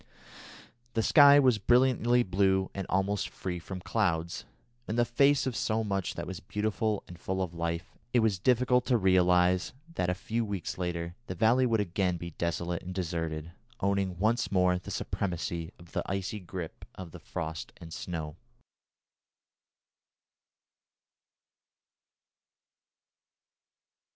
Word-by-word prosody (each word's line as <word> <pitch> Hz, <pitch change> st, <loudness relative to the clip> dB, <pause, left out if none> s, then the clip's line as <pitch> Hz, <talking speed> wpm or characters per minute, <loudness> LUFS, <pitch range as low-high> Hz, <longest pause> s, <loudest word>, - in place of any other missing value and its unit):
The 115 Hz, -, +2 dB
sky 145 Hz, +2 st, +8 dB
was 130 Hz, -6 st, +4 dB
brilliantly 125 Hz, +1 st, +4 dB
blue 95 Hz, 0 st, +1 dB
and 95 Hz, -1 st, -4 dB
almost 95 Hz, +2 st, 0 dB
free 90 Hz, -2 st, -5 dB
from 90 Hz, +2 st, -7 dB
clouds. 85 Hz, -6 st, -1 dB, 0.4 s
In 110 Hz, -, -2 dB
the 120 Hz, 0 st, +3 dB
face 140 Hz, +4 st, +3 dB
of 130 Hz, -3 st, -2 dB
so 110 Hz, 0 st, 0 dB
much 100 Hz, -3 st, -2 dB
that 85 Hz, -, -4 dB
was 90 Hz, 0 st, -6 dB
beautiful 105 Hz, +2 st, -1 dB
and 90 Hz, -1 st, -11 dB
full 95 Hz, +2 st, -3 dB
of 90 Hz, -3 st, -2 dB
life, 85 Hz, 0 st, -3 dB, 0.2 s
it 120 Hz, -, +4 dB
was 105 Hz, -4 st, +1 dB
difficult 125 Hz, +2 st, +3 dB
to 125 Hz, -, +4 dB
realise 90 Hz, -1 st, +3 dB, 0.2 s
that 90 Hz, -, 0 dB
a 90 Hz, -, 0 dB
few 115 Hz, +5 st, -2 dB
weeks 100 Hz, -4 st, -4 dB
later 85 Hz, -1 st, -3 dB
the 90 Hz, -, -4 dB
valley 120 Hz, +7 st, +4 dB
would 115 Hz, -3 st, +2 dB
again 90 Hz, -1 st, 0 dB
be 85 Hz, 0 st, -7 dB
desolate 85 Hz, +1 st, -2 dB
and 90 Hz, +1 st, -7 dB
deserted, 80 Hz, -3 st, -3 dB, 0.3 s
owning 100 Hz, -2 st, 0 dB
once 110 Hz, +5 st, +1 dB
more 90 Hz, -1 st, +3 dB
the 90 Hz, -, -10 dB
supremacy 85 Hz, -3 st, -3 dB
of 85 Hz, 0 st, -16 dB
the -, -, -1 dB
icy 95 Hz, +2 st, -3 dB
grip 90 Hz, -3 st, -7 dB
of 90 Hz, -3 st, -8 dB
the -, -, -10 dB
frost 80 Hz, 0 st, -5 dB
and 80 Hz, -1 st, -10 dB
snow. 80 Hz, -4 st, -5 dB
95 Hz, 135 wpm, -30 LUFS, 85-110 Hz, 0.4 s, sky